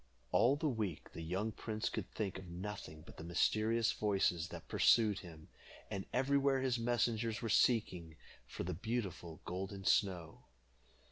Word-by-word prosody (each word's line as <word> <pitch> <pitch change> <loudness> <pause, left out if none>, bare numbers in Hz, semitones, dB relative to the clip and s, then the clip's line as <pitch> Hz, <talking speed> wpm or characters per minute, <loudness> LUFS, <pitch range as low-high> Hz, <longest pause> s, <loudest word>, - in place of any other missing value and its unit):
All 125 +4 +5
the 150 +2 -1
week 110 - -3
the - - -6
young 95 +7 -2
prince 110 0 -3
could - - -3
think 100 -3 -3
of 95 - -10
nothing 85 -3 -6
but - - -13
the - - -7
mysterious 110 +6 +2
voices 95 -5 +1
that - - -9
pursued 110 -4 +4
him, 80 -4 -12 0.4
and 100 -2 -4
everywhere 135 +1 +3
his 130 -2 +1
messengers 115 -1 0
were 115 - -1
seeking 90 -9 +2 0.3
for - - -5
the 90 +1 -2
beautiful 95 -5 -4
Golden 95 +2 -5
Snow. 90 -6 +1
105 Hz, 150 wpm, -36 LUFS, 90-115 Hz, 0.4 s, All